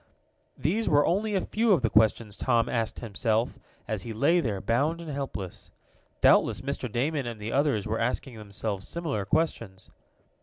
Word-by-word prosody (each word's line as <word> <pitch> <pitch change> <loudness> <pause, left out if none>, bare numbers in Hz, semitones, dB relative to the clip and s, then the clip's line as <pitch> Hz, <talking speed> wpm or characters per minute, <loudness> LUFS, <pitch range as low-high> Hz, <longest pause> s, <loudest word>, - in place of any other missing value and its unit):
These 210 +9 0
were 145 -1 +4
only 205 +3 +1
a 190 - +2
few 225 -1 +2
of 155 -9 +2
the 115 - +3
questions 110 -1 +3
Tom 120 -2 +2
asked 115 -2 -2
himself, 115 +1 -1 0.3
as 110 -4 -2
he 115 +3 -6
lay 145 +10 +3
there, 110 - -1
bound 140 - +1
and 165 -2 -6
helpless. 135 -10 -6 0.5
Doubtless - - +4
Mr. 135 -3 -4
Damon 140 +3 -1
and 115 -2 -6
the 105 +2 -4
others 140 -7 +1
were 110 +1 -1
asking 125 +2 -2
themselves 105 -2 -4
similar 155 -12 -3
questions. 110 - -1
120 Hz, 165 wpm, -27 LUFS, 110-150 Hz, 0.5 s, were